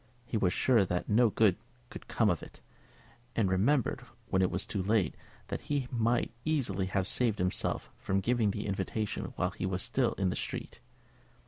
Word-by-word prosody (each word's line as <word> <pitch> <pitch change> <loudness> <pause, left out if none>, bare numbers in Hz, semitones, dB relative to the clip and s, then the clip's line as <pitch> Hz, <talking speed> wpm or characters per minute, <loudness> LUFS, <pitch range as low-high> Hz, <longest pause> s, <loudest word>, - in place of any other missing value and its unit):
He 120 - -4
was 95 -5 +3
sure 120 -1 +4
that 90 -1 -2
no 115 +2 +5
good 105 -3 +3 0.3
could - - -9
come 110 -4 +3
of 85 - -2
it, - - -12 0.8
and 100 -5 +2
remembered, 115 +8 +2 0.3
when 95 - +2
it 90 - +3
was 90 +2 -2
too 100 - -2
late, 100 -3 +2 0.4
that - - -3
he 140 -3 -1
might 120 0 +1
easily 115 -12 0
have 95 0 0
saved 115 -3 +1
himself 90 0 -1
from 95 0 0
giving 115 +1 +2
the 105 +1 -3
invitation 100 +2 -2
while 90 +1 0
he 95 - -3
was 95 0 0
still 120 +1 +1
in 95 -2 0
the - - -3
street. - - -5
105 Hz, 185 wpm, -31 LUFS, 95-115 Hz, 0.8 s, no